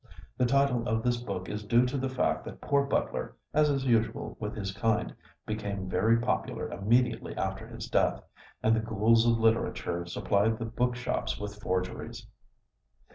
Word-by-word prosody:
The 125 - +2
title 130 -2 +2
of 110 -1 0
this 120 -1 +2
book 100 -6 -5
is 105 0 -4
due 120 +4 +4
to 125 +3 -2
the 135 -1 -1
fact 130 - 0
that - - -8
poor 140 -1 +2
Butler, 140 - -1 0.2
as 150 0 +4
is 135 -2 0
usual 115 -3 +1
with 105 -1 -4
his 100 -3 -3
kind, 110 +1 0 0.3
became 100 -3 -3
very 110 +5 +3
popular 115 - -1
immediately 115 +7 +1
after - - -3
his - - -7
death, - - +1 0.4
and 110 +1 +4
the - - +2
ghouls 115 +1 +3
of 115 -1 +4
literature 110 -6 +1
supplied 105 +5 +1
the 115 - -4
book 120 +2 0
shops 125 -2 -2
with 105 0 -6
forgeries. 90 -1 -3
115 Hz, 170 wpm, -29 LUFS, 105-125 Hz, 0.4 s, due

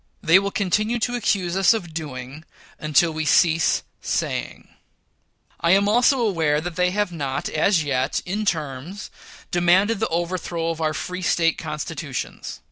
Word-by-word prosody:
They 165 +1 +6
will 200 0 -2
continue 210 +4 0
to 245 +1 -1
accuse 195 -7 0
us 195 +4 +4
of 175 -7 -6
doing, 145 -2 -7 0.4
until 155 +2 +3
we 155 0 -2
cease 160 0 +3 0.2
saying. - - -3 0.9
I 170 +1 +3
am 200 +1 +4
also 245 +5 +4
aware 165 -9 +1
they 180 +2 0
have 205 0 -1
not 140 -5 -3
as 165 +2 +2
yet, 135 -2 0
in 200 +4 -2
terms, 160 +1 -3 0.4
demanded 185 +5 +3
the 220 - +1
overthrow 170 0 -2
of 165 0 -6
our 155 -1 0
free 180 0 -5
State 165 -2 +1
constitutions. 150 -2 -5
170 Hz, 145 wpm, -23 LUFS, 155-195 Hz, 0.9 s, They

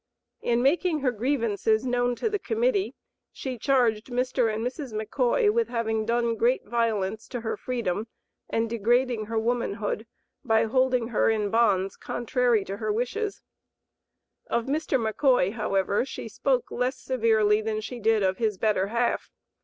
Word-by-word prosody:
In 240 0 +1
making 315 +2 +2
her 260 -2 +2
grievances 225 -2 0
known 245 -1 +1
to 450 - -1
the 420 -2 -1
Committee 450 -3 0 0.4
she 255 -3 -6
charged 235 -5 +2
Mr. 250 -2 0
and 220 +2 -3
Mrs. 255 -1 -5
McCoy 250 - +1
with 465 0 +1
having 220 -2 -1
done 235 0 +1
great 240 +4 +2
violence 220 -2 -1
to 245 -3 -5
her 225 - -2
freedom 225 -4 -2 0.4
and 225 0 0
degrading 235 +1 +1
her 225 0 -2
womanhood 220 -2 -1 0.4
by 225 -3 +3
holding 250 0 +1
her 230 - +2
in 210 -2 0
bonds 200 -5 +2
contrary 240 -3 0
to 195 +1 -5
her 215 0 -1
wishes. 380 - -2 1.0
Of 235 -1 0
Mr. 295 +1 0
McCoy, 225 -3 +2
however, 200 -2 0
she 260 - -7
spoke 255 +3 -1
less 250 +2 -1
severely 220 -4 +2
than 215 0 -2
she 240 +3 -6
did 220 -1 +2
of 190 0 0
his 215 -4 0
"better 200 -2 +1
half." 235 +3 -1
235 Hz, 155 wpm, -26 LUFS, 215-255 Hz, 1.0 s, by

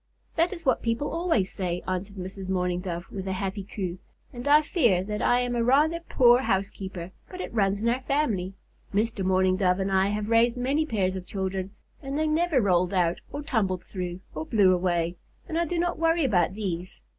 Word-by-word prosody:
"That 335 +2 +2
is 340 -4 -7
what 260 - +2
people 235 +5 -1
always 330 - +1
say," 180 -2 -3
answered 185 +2 -3
Mrs. 190 0 -6
Mourning 180 -1 0
Dove, 175 -1 -4
with 195 -1 -5
a 190 - -1
happy 195 +1 -3
coo, 185 -2 -5 0.3
"and 245 +2 -6
I 300 +1 +6
fear 235 - +2
that 210 +2 -4
I 245 0 +3
am 245 0 -1
a 235 - +1
rather 300 +7 +3
poor 245 -7 +4
housekeeper, 190 -4 -3 0.2
but 365 - -9
it - - -5
runs 200 -1 +1
in - - +1
our 245 +3 +1
family. 225 -10 -1 0.4
Mr. 210 0 0
Mourning 185 0 +3
Dove 180 -1 +2
and 195 0 -1
I 190 0 +3
have 210 +2 -2
raised 230 +1 +4
many 280 +5 0
pairs 190 -6 0
of 185 -1 -6
children, 190 -1 -3 0.3
and 275 0 -4
they 310 - +1
never 310 -1 +2
rolled 185 -3 +2
out, 175 -1 +1
or 290 +1 -5
tumbled 200 - 0
through, 180 -1 -5
or 155 - -4
blew 190 0 +4
away, 175 -1 0 0.3
and 320 - -5
I 340 +1 +2
do 345 +2 -2
not 345 -1 0
worry 330 -1 +2
about 185 -6 +2
these. 185 - -4
200 Hz, 205 wpm, -26 LUFS, 185-260 Hz, 0.4 s, I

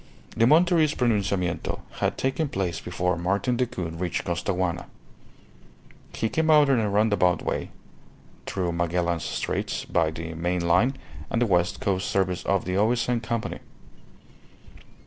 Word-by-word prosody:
The 115 - +4
Monterist 160 0 +4
pronunciamento 100 -6 0 0.2
had - - 0
taken 135 +3 -1
place 95 - -2
before 90 0 -1
Martin 100 +8 0
Decoud 90 -10 -3
reached 90 -2 -2
Costaguana. 90 0 -1 1.3
He 110 - 0
came 160 +7 0
out 150 -2 +6
in 130 -3 +4
a 105 -2 0
roundabout 100 -3 +2
way, - - -2 0.8
through 90 -3 -1
Magellan's 85 0 0
Straits - - -2
by 80 -3 +1
the 80 +1 -6
main 85 +1 -1
line 125 +10 +3 0.3
and 115 - 0
the 120 - +3
West 90 -5 +1
Coast 95 -1 0
Service 90 -2 0
of 100 -2 +1
the 90 +1 -1
O.S.N. 120 +3 +2
Company. 115 -1 -3
95 Hz, 135 wpm, -25 LUFS, 90-120 Hz, 1.3 s, out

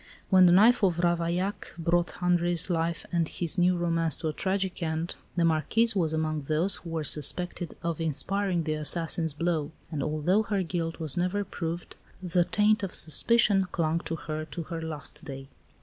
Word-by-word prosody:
When 185 -1 +7
the - - +5
knife 220 +8 +6
of 180 -4 +3
Ravaillac 175 +3 -1
brought 170 +1 +1
Henri's 175 0 +2
life 165 0 -1
and 170 -2 +1
his 175 +2 -2
new 180 0 +3
romance 165 -3 0
to 160 - -3
a - - -4
tragic 190 +1 -2
end, 160 +1 -2 0.2
the 170 -1 +2
Marquise 210 +8 +2
was 165 -5 +1
among 155 -1 -1
those 155 +7 +2
who 170 - -10
were 165 -1 -2
suspected 175 +4 -1
of 170 -1 -2
inspiring 180 +3 -1
the 155 -1 -1
assassin's 160 +1 +2
blow; 160 -1 -1 0.2
and 150 -3 -3
although 155 +8 +1
her 205 -3 -1
guilt 165 -1 -3
was 155 -2 -2
never 180 +3 0
proved, 170 -1 -5 0.2
the 180 -1 +1
taint 210 +4 +2
of 195 -2 -1
suspicion 195 +3 +2
clung 165 0 0
to 165 - -3
her 155 -1 -5
to 165 +2 -6
her 165 0 -6
last 160 0 -6
day. 135 -3 -8
170 Hz, 180 wpm, -27 LUFS, 160-180 Hz, 0.2 s, When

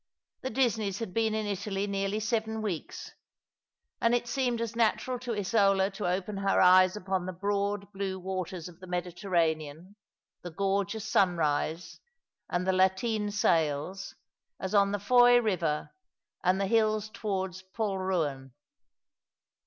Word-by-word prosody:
The 260 - -3
Disneys 220 -7 0
had 225 -5 -5
been 220 -1 +1
in 215 -1 -1
Italy 200 0 -2
nearly 200 +1 -1
seven 220 0 -1
weeks, 180 -7 -5 0.9
and 230 +1 +3
it 240 0 -1
seemed 245 -2 0
as 230 0 -3
natural 235 +2 +1
to 245 -2 -4
Isola 195 -1 +2
to 195 -1 -4
open 195 +3 -2
her 195 0 +1
eyes 185 +1 +6
upon 190 -3 -2
the - - -2
broad 200 +2 -1
blue 195 -1 -3
waters 185 -2 -4
of 175 -2 -14
the 185 - -11
Mediterranean, 175 -1 -2 0.5
the 175 - -6
gorgeous 200 +4 -1
sun 180 -4 +3
rise, 160 +2 -1 0.5
and 175 +1 -1
the 190 - +2
lateen 195 +3 +1
sails, 170 -1 0 0.4
as 190 +1 -4
on 200 -1 +4
the 205 - 0
Fowey 245 +4 +6
river 175 -9 -1 0.5
and 185 +1 +2
the 195 - +1
hills 215 0 +2
towards 190 -3 -3
Polruan. 185 - -2
195 Hz, 140 wpm, -29 LUFS, 180-215 Hz, 0.9 s, eyes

